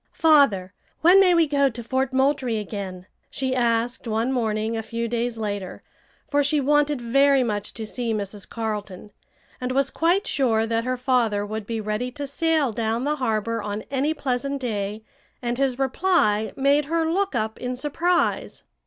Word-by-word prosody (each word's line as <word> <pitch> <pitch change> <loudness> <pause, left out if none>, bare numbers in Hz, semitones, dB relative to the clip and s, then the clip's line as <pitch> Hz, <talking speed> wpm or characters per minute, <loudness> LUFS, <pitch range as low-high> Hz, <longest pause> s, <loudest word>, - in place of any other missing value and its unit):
"Father, 275 - +4 0.3
when 360 +4 +7
may 365 -2 +5
we 335 -1 +5
go 280 -2 +2
to 235 -1 -8
Fort 260 +3 -1
Moultrie 265 -3 +1
again?" 195 -3 -6 0.2
she 265 -1 -2
asked 235 0 0
one 225 +3 0
morning 220 -3 -1
a 225 - -2
few 230 +1 -4
days 235 0 -2
later, 205 -4 -4 0.4
for 290 0 +2
she 290 +2 +2
wanted 295 0 +2
very 275 +3 +3
much 210 -3 -3
to 225 - -5
see 235 +1 -3
Mrs. 205 -2 -4
Carleton, 210 -3 -5 0.5
and 250 0 -2
was 275 0 +1
quite 350 +5 +1
sure 225 -5 +1
that 230 +1 -1
her 255 0 -1
father 240 -5 +1
would 215 0 -5
be 230 -1 -2
ready 215 +3 -2
to 290 0 -5
sail 310 -1 +1
down 225 +2 -1
the 300 +2 0
harbor 230 -3 -1
on 205 +1 -4
any 280 +3 +1
pleasant 275 -2 -2
day, 215 -3 -3 0.4
and 240 0 -3
his 265 -2 +1
reply 270 - +1
made 280 +2 +3
her 325 +2 0
look 385 0 0
up 220 -1 -2
in 250 0 -3
surprise. 330 +7 0
245 Hz, 170 wpm, -24 LUFS, 220-280 Hz, 0.5 s, when